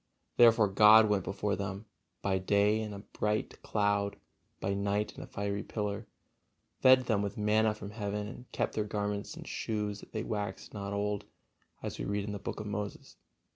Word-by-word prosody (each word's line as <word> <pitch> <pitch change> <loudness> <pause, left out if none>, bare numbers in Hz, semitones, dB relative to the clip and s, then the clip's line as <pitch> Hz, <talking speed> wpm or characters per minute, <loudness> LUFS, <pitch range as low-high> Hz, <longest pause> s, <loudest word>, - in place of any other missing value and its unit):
Therefore 115 -3 +7
God 110 +3 +8
went 100 -3 +2
before 100 +1 -1
them, 100 +1 -4 0.4
by 95 -1 +1
day 100 +3 +3
in 110 -1 -4
a 100 0 -8 0.2
bright: 105 0 -1
cloud, 100 -1 +1 0.4
by 100 +1 -1
night 100 +1 -1
in - - -8
a - - -8
fiery 100 0 -2
pillar, 105 -2 -3 0.7
fed 130 0 +7
them 110 -5 +1
with 100 +2 -3
manna 105 +1 +3
from 105 -1 -8
heaven, 105 -1 -3
and 120 +3 -10
kept - - -1
their 110 - 0
garments 105 0 -3
and - - -9
shoes 105 -2 -2
that - - -14
they 110 - -3
waxed 105 -1 -4
not 100 -2 -4
old, 100 0 -1 0.6
as - - -5
we - - -2
read 100 0 -1
in 105 - -4
the 100 - -4
Books 105 - -5
of - - -7
Moses. 105 0 -5
105 Hz, 185 wpm, -31 LUFS, 100-105 Hz, 0.7 s, God